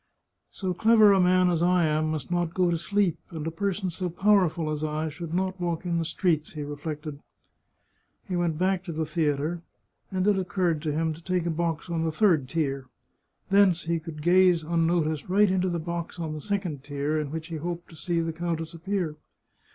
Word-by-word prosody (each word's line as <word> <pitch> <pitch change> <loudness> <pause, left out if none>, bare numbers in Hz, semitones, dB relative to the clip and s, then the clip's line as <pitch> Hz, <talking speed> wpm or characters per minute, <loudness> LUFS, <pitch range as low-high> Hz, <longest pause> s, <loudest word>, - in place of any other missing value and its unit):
" - - -54
So 185 -2 -3
clever 215 +2 +6
a 195 - +4
man 180 0 +4
as 170 -2 0
I 180 -1 +3
am 155 0 +1
must 155 -1 -4
not 175 -1 0
go 180 -2 +3
to 170 - +1
sleep, 200 -1 +1
and 160 -2 -6
a 165 - -2
person 195 +1 -2
so 180 +2 -3
powerful 175 -4 +2
as 150 0 -3
I 155 +1 -1
should 160 +1 -7
not 185 +1 -1
walk 170 0 -2
in 170 -1 0
the 165 - -1
streets," 160 -3 0
he 150 - -5
reflected. 150 0 -6 1.1
He 185 - -2
went 170 -3 0
back 185 +1 +1
to 175 - -4
the 160 0 -2
theatre, 155 +1 -1 0.5
and 185 +1 0
it 205 -2 +4
occurred 175 -4 0
to 155 -2 -1
him 160 +1 0
to 165 +2 -13
take 180 -1 0
a 170 - 0
box 165 0 -2
on 165 -2 -1
the 165 - 0
third 160 -7 +2
tier. 140 -5 -1 0.6
Thence 195 -3 +4
he 165 0 0
could 160 -2 -8
gaze 180 -1 +5
unnoticed 165 -1 0
right 200 +1 +4
into 185 0 +1
the 175 - -1
box 170 +1 -4
on 160 -2 -3
the 155 - -6
second 185 -9 -3
tier, 145 +2 -1
in 150 -2 -3
which 160 +2 -6
he 165 - -4
hoped 170 +2 -5
to - - -12
see 170 +2 -1
the 165 0 -2
countess 165 0 -3
appear. 170 -2 -3
170 Hz, 210 wpm, -27 LUFS, 155-180 Hz, 1.1 s, clever